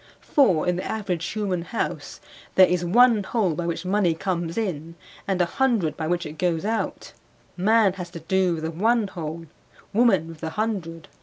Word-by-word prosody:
For 185 - +4
in 180 0 +1
the 185 - -3
average 195 -6 -3
human 195 -2 -2
house 225 +7 -4 0.4
there 190 - +8
is 180 -1 0
one 230 +4 +5
hole 195 -3 0
by 170 +2 -3
which 170 +1 -3
money 185 -3 +2
comes 170 0 -3
in 165 -7 -3 0.3
and 190 -2 0
a 175 - +4
hundred 225 -5 0
by 160 - -3
which 175 +1 -1
it 150 0 -8
goes 175 0 0
out; 225 +1 -3 0.4
man 210 +1 +3
has 180 -2 -7
to 170 - -8
do 185 +1 +1
with 160 - -6
the 160 - -2
one 220 +6 +2
hole, 165 -2 -6 0.5
woman 205 -7 +3
with 165 -2 -10
the 160 - -4
hundred. 170 -6 -3
180 Hz, 185 wpm, -24 LUFS, 165-210 Hz, 0.5 s, there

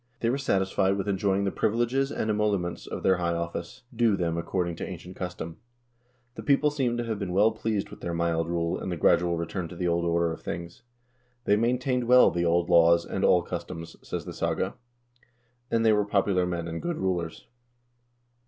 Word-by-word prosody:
They 115 - +2
were 135 - -1
satisfied 95 -5 +1
with 100 0 -3
enjoying 100 0 +1
the 100 - 0
privileges 120 +7 0
and 110 - -1
emoluments 105 -5 -1
of - - -6
their 95 -1 +4
high 85 -1 0
office, 85 +8 -5
due 115 -3 +3
them 85 -2 -1
according 85 0 -2
to - - -5
ancient 90 0 -9
custom. 90 -3 -6 0.8
The - - -8
people 145 +1 +3
seem 130 -5 0
to 120 - -1
have 110 -3 -3
been 95 -3 -3
well 105 +4 +4
pleased 110 -2 -2
with - - -11
their 85 - -3
mild 85 -1 0
rule 85 -1 -1
and 95 - -4
the 85 - -2
gradual 85 +2 +3
return 85 +1 -3
to 90 - -10
the 90 +1 -1
old 85 0 +1
order 85 0 +1
of - - -10
things. 85 +3 -6 0.6
"They 100 - +4
maintained 125 +3 +1
well 125 +1 +6
the 85 0 0
old 85 0 +2
laws 85 0 +5
and - - -3
all 90 - +5
cus 85 -1 -4
toms," 85 -1 -8
says - - -5
the - - -6
saga, - - -1 0.5
" 120 0 -38
and 115 0 +1
they 110 - +6
were 105 0 +3
popular 100 -3 +1
men 85 -1 -3
and 85 0 -5
good 175 -2 -2
rulers." 90 -3 -2
95 Hz, 205 wpm, -27 LUFS, 85-115 Hz, 0.8 s, well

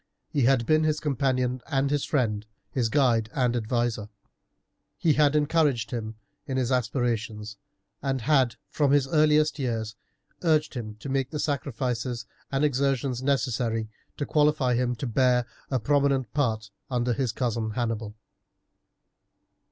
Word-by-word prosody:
He 140 -5 +1
had 130 -2 +3
been 155 +3 +3
his 155 -1 +1
companion 130 -3 0
and 140 -1 +1
his 145 -1 +1
friend, 110 -7 0 0.2
his 120 -4 0
guide 120 -5 +2
and 125 -3 +2
adviser. 120 -2 -1 0.9
He 160 - +3
had 150 -1 +3
encouraged 145 -6 +2
him 110 -2 -4 0.3
in 130 - -2
his 130 -1 0
aspirations, 115 -4 -1 0.4
and 135 -2 -1
had 130 -2 +3 0.2
from 145 -2 +2
his 140 -2 +3
earliest 150 0 +3
years 115 -4 -2 0.5
urged 155 -3 +2
him 110 -5 -5
to 140 - -6
make 135 -1 0
the 150 - -4
sacrifices 130 -4 -2 0.3
and 135 +2 +2
exertions 135 -2 0
necessary 120 -5 0 0.3
to 145 - -2
qualify 150 -4 +2
him 125 0 +1
to 130 - -5
bear 125 0 +2 0.2
a 130 - +1
prominent 140 -1 +1
part 110 -8 0 0.2
under 125 -1 0
his 130 -2 0
cousin 115 -1 -1
Hannibal. 110 -2 -3
130 Hz, 140 wpm, -26 LUFS, 115-140 Hz, 0.9 s, had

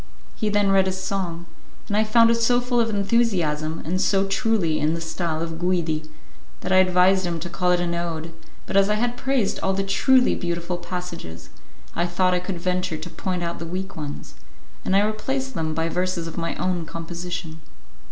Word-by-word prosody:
He 215 - -1
then 205 -1 +3
read 190 -1 +4
his 190 0 -2
song, 180 -3 -3 0.4
and 205 - -1
I 215 - +4
found 230 +1 +5
it 230 0 +1
so 245 +1 +4
full 245 0 0
of 230 -1 +2
enthusiasm, 190 -8 +1
and 185 +4 0
so 195 -1 +3
truly 195 -6 +1
in 155 +2 +1
the - - -4
style 165 0 -2
of 165 -1 -5
Guidi, 165 -4 0 0.5
that - - -3
I 185 - +6
advised 185 +1 +5
him 170 -2 -2
to 175 +2 -5
call 180 0 0
it 180 - +3
an 175 -1 -1
ode; 165 -1 -3 0.3
but - - -5
as 195 0 +5
I 210 - +3
had 240 +2 0
praised 260 -5 0
all 190 - 0
the 195 +1 0
truly 250 +6 +4
beautiful 175 0 -2
passages, 175 - -7 0.5
I 170 +1 +1
thought 180 +1 +2
I 180 - +2
could 180 -1 -4
venture 180 -1 -1
to 175 - -7
point 180 -2 -3
out 170 0 -3
the 170 - -5
weak 190 +3 -4
ones, 150 -2 -6 0.5
and 190 - +1
I 200 +1 +5
replaced 265 +5 -2
them 160 -4 -2
by 165 +1 0
verses 180 0 -1
of 165 - -6
my 165 0 -2
own 180 -2 -1
composition. 165 0 -6
180 Hz, 200 wpm, -24 LUFS, 170-200 Hz, 0.5 s, I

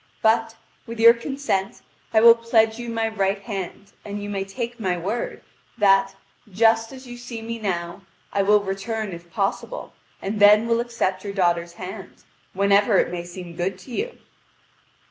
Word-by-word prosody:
But, 225 0 +2 0.3
with 230 0 -7
your 230 +1 +9
consent, 235 -5 -3 0.3
I 220 - +4
will 230 0 +10
pledge 230 -1 +2
you 240 0 -5
my 225 -1 0
right 200 -2 0
hand, 195 -1 -6
and 205 0 -5
you 205 0 -5
may 195 -1 -2
take 235 +4 -6
my 185 -4 0
word, 200 +8 -4 0.3
that, 195 -2 +4 0.3
just 225 +3 +3
as 265 0 -11
you 245 -1 -9
see 240 -1 -7
me 230 0 -5
now, 175 -4 -3 0.3
I 200 - +2
will 205 +1 +4
return 205 +1 -3
if 170 0 -10
possible, 200 - -3 0.3
and 205 +2 -3
then 210 +2 +7
will 230 0 +2
accept 230 -6 -2
your 200 -1 -5
daughter's 170 -3 +1
hand, 190 +2 -9 0.3
whenever 200 +1 +3
it - - +2
may 175 -1 -4
seem 175 -1 -9
good 180 +3 -1
ro 240 +7 -13
you." 475 - -3
205 Hz, 170 wpm, -23 LUFS, 195-230 Hz, 0.3 s, will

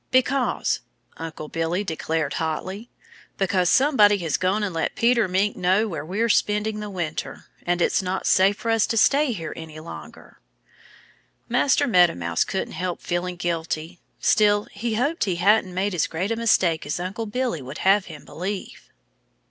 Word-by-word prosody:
"Because 260 0 +1 0.2
" - - -46
Uncle 160 -2 -7
Billy 165 +5 -1
declared 160 -4 -2
hotly 185 +8 -4 0.5
"because 185 -2 +1
somebody 235 -8 +5
has 165 -5 -1
gone 190 +3 0
and 195 -4 -2
let 165 - -2
Peter 235 -2 +3
Mink 190 +3 +1
know 190 +5 +2
where 165 -7 -5
we're 200 +8 -1
spending 210 0 +1
the 210 0 -5
winter. 175 -5 -5 0.2
And 175 0 +2
it's - - +2
not 185 0 -3
safe 195 +2 +4
for 230 - -2
us 225 -2 +3
to 225 - -1
stay 280 +5 +4
here 165 -8 -5
any 160 -1 -9
longer." 160 - -11 1.1
Master 285 +1 +2
Meadow 180 -9 +4
Mouse 85 -1 0
couldn't 190 - -4
help 180 -1 -3
feeling 180 +1 -3
guilty. 170 -1 -3 0.2
Still, 205 -1 +3
he 230 -1 -3
hoped 285 +9 0
he 185 -3 -1
hadn't 195 +2 +3
made 190 +2 -1
as 175 - +1
great 180 +6 -3
a - - +1
mistake 190 -9 +2
as 150 - -2
Uncle 190 +5 -4
Billy 240 - -2
would 130 +3 -8
have 195 0 +4
him 155 -4 -11
believe. 190 +3 -6
190 Hz, 170 wpm, -23 LUFS, 170-215 Hz, 1.1 s, somebody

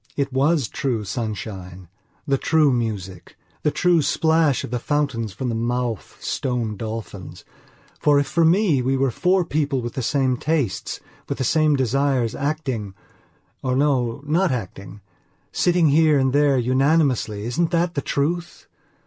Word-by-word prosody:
It 140 -2 -1
was 140 0 +2
true 120 0 -2
sunshine; 100 -5 -6 0.4
the 135 -2 +1
true 155 -4 +3
music; 100 -7 -4 0.2
the - - +2
true 175 +2 +2
splash 160 -1 +2
of - - -7
the 125 - -1
fountains 130 -6 -1
from 125 +6 -4
the - - -2
mouth 120 - -2
of - - -19
stone 120 -5 -2
dolphins. 110 -3 -7 0.5
For, 145 -1 +4
if 145 - +1
for 170 - +1
me 165 -4 +3
we 135 +2 0
were 135 -1 +1
four 180 +7 +1
people 145 -4 -1
with 120 -1 -5
the 130 - -3
same 130 0 +1
tastes, 135 - -2 0.3
with - - -2
the - - -1
same 155 +3 +3
desires, 130 -2 +1
actingor, 130 -9 -3 0.7
no, 130 -1 0
not 170 +6 +2
actingsitting 105 - -2
here 155 0 +4
and 130 -1 +1
there 145 -1 +3
unanimously, 130 -4 +1
isn't 160 +8 0
that 170 0 0
the 140 - -2
truth? 170 +6 -2
135 Hz, 150 wpm, -22 LUFS, 115-150 Hz, 0.7 s, For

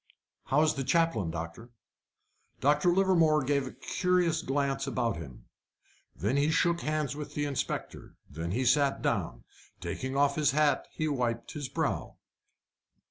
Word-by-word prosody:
"How 150 +3 +3
is 155 - +3
the 135 - -3
chaplain, 140 - +1
doctor?" 85 +8 -6 0.9
Dr. 150 +5 +3
Livermore 170 -5 +3
gave 140 0 0
a - - -6
curious 180 -3 0
glance 135 0 -1
about 120 - -1
him. 70 -7 -10 0.7
Then 105 - 0
he 145 +2 +3
shook 170 +1 +2
hands 150 -3 -1
with 150 0 -7
the 145 - 0
inspector. 140 -3 -4
Then 85 +1 -5
he 125 +8 -1
sat 140 +2 +3
down. - - -1 0.4
Taking 130 +1 -4
off 140 0 +3
his 150 -3 +3
hat, 150 -3 +2
he 155 - -2
wiped 120 -5 -1
his 145 -4 -5
brow. - - -2
140 Hz, 145 wpm, -29 LUFS, 125-155 Hz, 0.9 s, How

